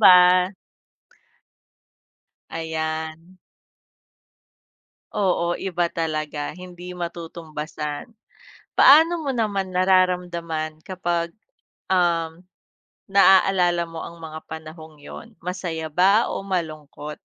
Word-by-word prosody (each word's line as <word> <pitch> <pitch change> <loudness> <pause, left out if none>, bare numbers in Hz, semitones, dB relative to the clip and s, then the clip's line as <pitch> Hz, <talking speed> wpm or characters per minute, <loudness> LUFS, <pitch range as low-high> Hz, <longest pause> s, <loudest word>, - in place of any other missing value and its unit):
ba? 180 -1 +7 2.0
Ayan. 160 +1 -4 1.8
Oo, 180 -4 +1
iba 175 -2 -1
talaga 155 -2 -3
hindi 180 0 -9
matutumbasan. 160 0 -6 0.6
Paano 320 +3 +7
mo 275 - 0
naman 200 -5 -1
nararamdaman 175 -4 +1
kapag, 175 -2 -2 0.6
um, 170 -2 +1 0.7
naaalala 190 -3 +5
mo 165 -1 -8
ang 170 - -8
mga 160 -1 -8
panahong 160 0 -9
yun, 230 +9 -11
masaya 175 -3 -4
ba 195 +7 +4
o - - -3
malungkot? 155 -5 -4
170 Hz, 80 wpm, -23 LUFS, 160-185 Hz, 2.0 s, ba